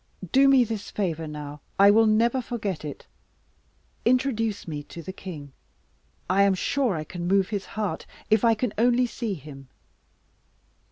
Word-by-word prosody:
Do 275 +1 +6
me 270 -2 +6
this 220 -3 -5
favour 165 -6 -2
now; 150 -1 -7 0.2
I 200 +1 +7
will 225 +1 +5
never 235 +4 +3
forget 210 -9 -4
it. 150 -2 -7 1.0
Introduce 230 -5 +1
me 150 -3 -4
to 170 - -10
the 190 - -7
king. 150 -8 -9 0.7
I 185 +2 +3
am 200 -1 +4
sure 250 +2 0
I 155 - -3
can 175 +2 -6
move 195 0 +2
his 205 -3 -3
heart, 205 -7 -2 0.2
if 215 0 +3
I 230 -1 +5
can 220 0 -2
only 245 +1 +4
see 230 -3 -3
him." 135 -3 -12
200 Hz, 160 wpm, -25 LUFS, 165-230 Hz, 1.0 s, I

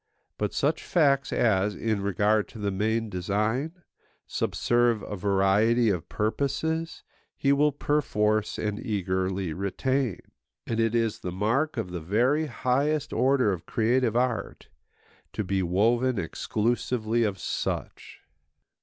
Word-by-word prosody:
But - - 0
such - - 0
facts 140 -5 +2
as, 105 -2 +2
in 110 -3 -1
regard 105 +2 +1
to - - -13
the 100 -2 -1
main 110 +4 0
design, 110 - -2 0.4
subserve 120 -3 +1
a 105 - -5
variety 100 +4 +3
of 90 -4 -4
purposes, 145 +9 -2 0.3
he 140 0 +3
will 150 +1 +3
perforce 110 -8 0
and 105 +1 -3
eagerly 95 - -1
retain. 110 - -1 0.5
And 115 -1 -2
it 115 0 +1
is 115 -2 0
the 90 - -5
mark 115 - 0
of 100 -6 -3
the 90 -2 -4
very 125 - +1
highest 140 +4 0
order 130 -6 +3
of 85 - -7
creative 120 0 +1
art 120 -3 -1 0.6
to 105 - -2
be 95 0 0
woven 115 +8 +2
exclusively 115 +5 -1
of 100 -3 -1
such. - - -4
110 Hz, 125 wpm, -27 LUFS, 100-130 Hz, 0.6 s, variety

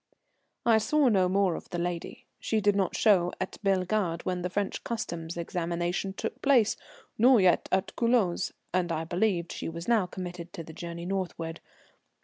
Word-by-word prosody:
I 225 -2 +5
saw 290 +4 +3
no 190 -4 +3
more 195 -1 +2
of - - -7
the 175 - -4
lady. 175 -1 -4
She 220 - 0
did 205 -1 +3
not 195 -3 0
show 185 -5 +4
at 185 - -4
Bellegarde 190 -3 0
when 180 -1 -2
the 180 - -2
French 200 +1 -2
Customs' 170 -7 -4
examination 175 +2 -2
took - - -5
place, 250 -6 +4 0.4
nor 245 +1 +7
yet 185 -2 +3
at 190 +1 0
Culoz, 230 -7 +2 0.2
and 180 -2 +1
I 160 0 -1
believed 175 0 0
she - - -4
was 170 +1 -7
now 225 -6 +3
committed 175 -2 -7
to 165 - -6
the 160 - -11
journey 170 +1 -6
northward. 175 -3 -3
185 Hz, 170 wpm, -28 LUFS, 170-205 Hz, 0.4 s, nor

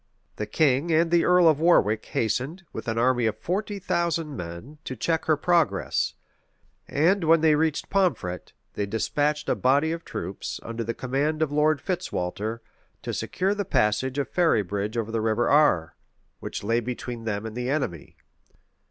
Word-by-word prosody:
The 105 - -3
king 140 +6 +2
and 165 +1 +3
the 170 -1 +4
earl 180 -1 +5
of 155 -2 +4
Warwick 110 - +3
hastened, 130 - -2
with - - -6
an 115 0 -1
army 120 0 +2
of 110 - -2
forty 205 +3 -3
thousand 170 -5 -1
men, 90 - -8
to 130 - -5
check 160 +7 -1
her 155 -2 +3
progress; 170 0 +1 0.7
and 175 +6 +2
when 165 0 +5
they 160 -1 +5
reached 155 0 0
Pomfret, 170 - 0 0.2
they 100 - -2
despatched 145 +8 -1
a - - +3
body 140 +5 +2
of 165 0 -4
troops, 95 +4 -5
under 115 0 -4
the 115 +1 -3
command 145 +5 0
of 150 - -2
Lord 150 0 +2
Fitzwalter, 115 - -3 0.4
to - - -4
secure 190 +2 -1
the 205 0 -2
passage 130 - +1
of 140 - 0
Ferrybridge 105 - 0
over 115 -1 -2
the 115 -1 -1
River 110 +2 +1
Are, 140 - +3 0.4
which - - -6
lay 115 +3 +1
between 120 -1 -5
them 105 -1 -2
and 110 0 -6
the 125 +1 -3
enemy. 130 - -3
140 Hz, 170 wpm, -25 LUFS, 110-160 Hz, 0.7 s, earl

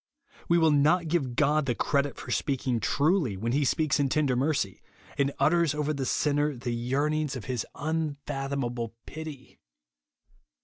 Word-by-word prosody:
We 170 - +5
w^ill 160 -3 +4
not 155 +4 +3
give 140 -7 0
God 150 0 +2
the 120 - +1
credit 140 +1 0
for 120 - -7
speaking 130 -2 0
tridy 145 - +1
when 115 +4 -2
he 145 +3 +2
speaks 150 +2 +1
in 140 -1 +2
ten 155 +2 +2
der 130 -2 +1
mercy, 130 -8 0 0.3
and 140 0 +1
utters 165 -2 +3
over 150 0 0
the 135 -3 -3
sinner 145 +1 +1
the 120 0 -3
yearnings 140 +5 0
of 125 - -6
his 125 -3 -3
unfathomable 140 -6 -3
pity. 155 -4 -9
140 Hz, 160 wpm, -28 LUFS, 130-155 Hz, 0.3 s, We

